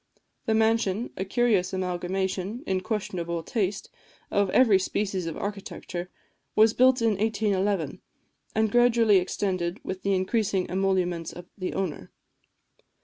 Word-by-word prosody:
The 220 - +3
mansion, 225 -1 +1
a 190 - -2
curious 200 -3 +1
amalgamation, 190 +4 -2
in 190 -1 0
questionable 185 -5 -3
taste, 200 -2 -2 0.4
of 200 -1 +2
every 215 -3 +5
species 190 -2 -2
of 165 - -4
architecture, 195 -3 -5 0.5
was 220 +1 +6
partly - - -26
built 260 -2 +4
in 225 - +4
1811, 200 -6 0 0.5
and 220 -1 +2
gradually 235 -3 +5
extended 185 -1 -1
with 190 0 -5
the 200 -1 +1
increasing 190 0 0
emoluments 180 -3 0
of 175 0 -10
the 185 -2 -4
owner. 185 -6 -3
195 Hz, 130 wpm, -26 LUFS, 185-220 Hz, 0.5 s, was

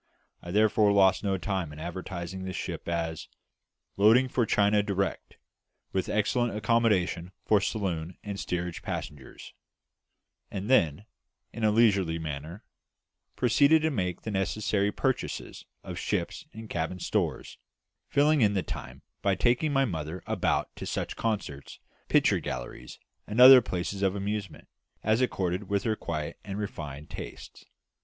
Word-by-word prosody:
I 85 - -9
therefore 105 +1 +4
lost 95 -1 +4
no 100 -2 +1
time 95 -4 -2
in 75 - -11
advertising 90 +2 -6
the 95 0 -4
ship - - -5
as 80 -2 -2 0.7
"loading 115 +6 +6
for 120 -3 +1
China 105 0 +3
direct, 100 -1 -3 0.6
with 95 - -1
excellent 115 +2 +1
accommodation 105 -6 +1
for 105 -2 +4
saloon 90 -5 -2
and 100 -1 -5
steerage 90 -2 -3
passengers;" 70 -3 -7 1.0
and 100 +5 -4
then, 85 - +3 0.5
in 115 - -5
a 110 - +5
leisurely 100 -7 +3
manner, 80 +5 -6 0.7
proceeded 140 +6 +4
to 160 - +2
make 90 - -2
the 110 - -4
necessary 100 +1 0
purchases - - -3 0.2
of - - -6
ship's - - -3
and 110 0 -9
cabin 85 -1 -3
stores, - - -2 0.5
filling 145 +1 +3
in 105 -2 +3
the 95 - +1
time - - -8 0.2
by 100 -1 +2
taking 125 - +2
my 135 -1 +3
mother 80 - -5
about - - -1
to - - -6
such - - -3
concerts, 100 -11 -3 0.3
picture - - +4
galleries, - - -6 0.3
and 105 +3 -3
other 130 0 +11
places 95 -1 -3
of 95 0 +1
amusement, 100 -1 -4 0.4
as 110 +3 +2
accorded 95 -5 -1
with 100 -1 0
her 110 -1 0
quiet 75 -6 -4
and 100 0 -5
refined 75 -8 -6
tastes. - - -9
100 Hz, 140 wpm, -28 LUFS, 85-110 Hz, 1.0 s, other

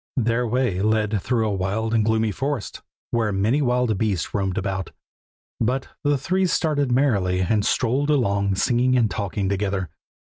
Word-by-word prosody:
Their 120 0 +1
way 120 -6 0
led 110 -1 +1
through 115 -1 0
a 105 - -1
wild 100 +4 -1
and 115 -2 +3
gloomy 110 0 +1
forest, 135 +1 -4 0.3
where 115 -3 +1
many 105 +9 +1
wild 125 -5 +1
beasts 100 -7 -1
roamed 95 -1 -1
about; 95 -4 -2 0.7
but 130 +4 -1
the 145 -1 +2
three 185 +7 0
started 145 -6 0
merrily, 100 -9 +2
and 105 +3 +1
strolled 130 +7 +1
along 100 -8 +1
singing 125 +5 +2
and 115 -5 +2
talking 100 0 -2
together. 100 -2 -1
110 Hz, 155 wpm, -23 LUFS, 100-125 Hz, 0.7 s, and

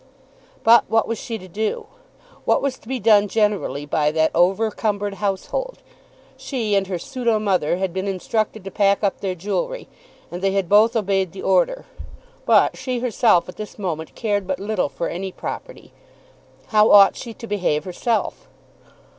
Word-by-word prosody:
But 235 +1 +6
what 225 0 +2
was 230 -1 -3
she 230 -2 -5
to 185 -3 -12
do? 220 - -3 0.6
What - - +2
was 275 -2 -2
to - - -21
be 260 +1 -2
done 210 -1 +4
generally 205 -9 0
by 150 0 +1
that 160 +1 +1
over 190 +6 +2
cumbered 205 -2 -2
household? 210 - -3 0.5
She 230 -7 -3
and 195 -1 +2
her 185 -2 -2
pseudo 235 +3 -1
mother 185 -6 0
had 190 -2 -2
been 190 +1 -3
instructed 215 +2 -2
to 195 - -7
pack 200 0 +2
up 200 - 0
their 190 -2 -2
jewellery, - - -3 0.4
and 175 +1 -6
they 195 0 +1
had 195 -2 0
both 215 +4 +5
obeyed 195 -4 0
the 195 - -8
order. - - +1 0.6
But - - +4
she 255 -1 -3
herself 235 -6 +2
at 180 - -10
this 215 -1 -8
moment 165 -6 -4
cared 205 -4 -1
but 185 -1 -2
little 200 -5 -1
for 170 - -4
any 190 +2 -4
property. - - -8 0.8
How 215 0 +4
ought 200 -1 +7
she 230 -3 -8
to 230 - -9
behave 185 -8 -1
herself? 230 - -2
205 Hz, 170 wpm, -21 LUFS, 185-225 Hz, 0.8 s, ought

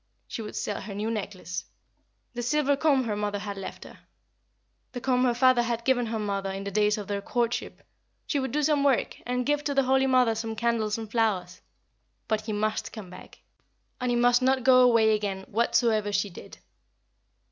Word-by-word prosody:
She - - -5
would 210 - -7
sell 205 - -3
her 200 -1 -7
new 215 +3 -2
necklace; 190 -4 -5 0.7
the 245 - -4
silver 285 +3 +2
comb 275 -2 +2
her 220 -3 -2
mother 205 0 -2
had 200 0 -5
left, 195 -1 -7
her - - -13 0.9
the 245 - -4
comb 250 0 +1
her 240 -1 +2
father 255 0 +4
had 235 -1 -2
given 245 -3 +2
her 225 0 -2
mother 200 -2 -2
in 195 +1 -5
the 200 - -5
days 210 +1 +2
of 210 - -5
their 200 -1 -2
courtship; 235 +3 -2 0.4
she 290 - -1
would 265 0 -3
do 300 +1 0
some 290 -1 +2
work, 275 -4 +1
and 250 0 -1
give 295 +1 +1
to 285 - -1
the 275 - +4
Holy 265 +1 +3
Mother 255 -3 +4
some 225 0 -4
candles 225 -2 0
and 220 -2 -7
flowers; 200 -6 0 0.7
but 220 -1 0
he 215 0 -5
must 215 +1 -1
come 200 -5 -9
back, 185 - -13 0.6
and 250 -1 -1
he 245 - +1
must 245 +1 +4
not 260 0 +2
go 255 -1 +6
away 230 -3 +5
again 200 -2 -2
whatsoever 220 -1 +1
she 200 0 0
did. - - -12
230 Hz, 200 wpm, -27 LUFS, 210-255 Hz, 0.9 s, go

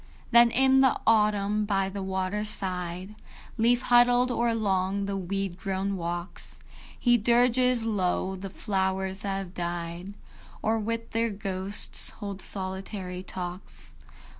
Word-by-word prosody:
III. - - -27
Then 235 0 +7
in 265 +2 +4
the 265 - +3
autumn, 210 -1 +3
by 195 -2 0
the 195 +1 -5
waterside, 190 -1 -3 0.5
Leaf 240 +2 +3
huddled; 245 +1 +4
or 235 0 +1
along 200 -3 0
the 200 0 -3
weed 195 -1 -3
grown 195 0 -2
walks, 175 +1 -5 0.4
He 240 -1 +4
dirges 245 +2 +3
low 190 -3 -1
the 195 +1 -7
flowers 190 -1 -2
that 195 -1 -2
have 190 -2 -6
died, 175 +2 -5 0.5
Or 225 +1 +1
with 230 +1 -3
their 230 +1 +1
ghosts 195 -1 +1
holds 200 -3 -6
solitary 190 -1 -4
talks. 175 - -7
195 Hz, 130 wpm, -27 LUFS, 185-225 Hz, 0.5 s, Then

